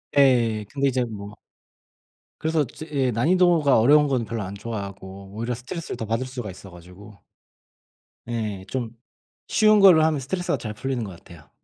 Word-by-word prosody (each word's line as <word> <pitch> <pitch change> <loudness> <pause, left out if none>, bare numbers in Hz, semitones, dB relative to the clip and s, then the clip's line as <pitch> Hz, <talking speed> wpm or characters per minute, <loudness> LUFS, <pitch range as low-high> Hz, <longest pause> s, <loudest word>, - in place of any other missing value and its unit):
예. 120 -6 +3
근데 140 0 0
이제 130 -1 0
뭐 105 -2 -8 1.0
그래서 160 -2 +1
저 140 +6 -10
예 135 -4 +1
난이도가 160 +2 +3
어려운 145 +6 +5
거는 130 -4 0
별로 115 0 -4
안 95 +1 -6
좋아하고 100 -2 -7
오히려 115 +3 -3
스트레스를 135 +8 -6
더 110 - -4
받을 115 +4 -1
수가 125 -6 -6
있어 95 +1 -12
가지고. 90 +4 -14 1.1
예. 105 -5 -3
좀 120 -3 -4 0.5
쉬운 215 -1 +4
걸로 180 -6 +7
하면 155 -2 +2
스트레스가 175 +3 -2
잘 110 -3 -6
풀리는 125 +1 -3
것 100 - -6
같아요. 85 -3 -15
120 Hz, 340 characters per minute, -24 LUFS, 105-140 Hz, 1.1 s, 걸로